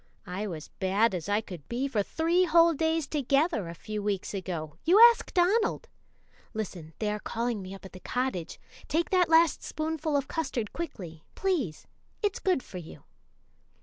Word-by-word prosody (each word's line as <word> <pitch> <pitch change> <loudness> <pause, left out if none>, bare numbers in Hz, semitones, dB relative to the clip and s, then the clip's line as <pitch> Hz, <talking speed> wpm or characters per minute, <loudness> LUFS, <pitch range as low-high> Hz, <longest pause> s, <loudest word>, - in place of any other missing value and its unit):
I 190 +4 -4
was 160 -5 -7
bad 195 +4 +2
as 180 +1 -4
I 205 +1 +2
could 175 -9 -10
be 250 +3 -1
for 235 -7 0
three 335 - +2
whole 335 0 +5
days 320 0 0
together 275 - +1
a 170 - -7
few 215 +3 -5
weeks 200 -2 -2
ago 170 -6 -5
you 365 +6 +5
ask 470 0 +7
Donald! 400 +6 +2 0.7
Listen! 175 -7 -5
they 210 -1 -1
are 210 - -3
calling 230 0 -2
me 190 +1 -7
up 195 - -13
at 190 - -11
the 185 - -9
cottage. 245 -5 -3 0.3
Take 330 +2 0
that 365 -3 +4
last 325 0 +5
spoonful 310 -1 -2
of 280 - -2
custard 250 -10 -3
quickly, 180 - -6
please; 315 - -1 0.4
it's 410 -2 0
good 365 -9 +1
for 185 - -8
you. 165 - -11
240 Hz, 175 wpm, -29 LUFS, -, 0.7 s, ask